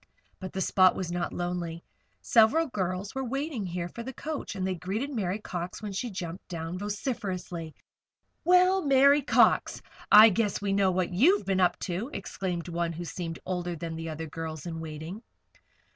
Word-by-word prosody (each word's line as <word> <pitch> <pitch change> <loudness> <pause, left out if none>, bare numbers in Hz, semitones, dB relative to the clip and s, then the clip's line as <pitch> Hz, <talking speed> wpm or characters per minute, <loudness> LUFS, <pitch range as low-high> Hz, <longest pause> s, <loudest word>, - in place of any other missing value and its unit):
But 190 -1 -7
the 190 - -2
spot 185 -1 +4
was 180 -2 -3
not 175 0 -2
lonely. 175 -1 -4 0.4
Several 240 +9 +5
girls 190 -3 -3
were 265 0 -2
waiting 265 - -3
here 175 0 -3
for 235 - -8
the 255 +3 -6
coach, 300 -8 -5
and 185 -1 -2
they 190 - 0
greeted 195 - -3
Mary 195 -5 -1
Cox 180 -4 -5
when 210 -2 -5
she 235 +6 -3
jumped 180 -2 -6
down, 170 0 -5
vociferously. 190 - -4 0.7
"Well, 365 +2 +5
Mary 280 +1 +5
Cox! 270 - +3 0.3
I 215 +2 +10
guess 210 0 0
we 200 -1 -1
know 195 -1 +3
what 185 -1 -1
you've 330 - +4
been 190 -1 +1
up 180 -1 +3
to," 195 +7 -3
exclaimed 185 -3 -4
one 170 -1 -2
who 175 +2 -6
seemed 165 -1 -5
older 175 -1 -2
than 165 0 -5
the 165 0 -5
other 160 +1 -5
girls 160 0 -6
in 165 -2 -5
waiting. 160 +5 -7
185 Hz, 175 wpm, -28 LUFS, 170-220 Hz, 0.7 s, I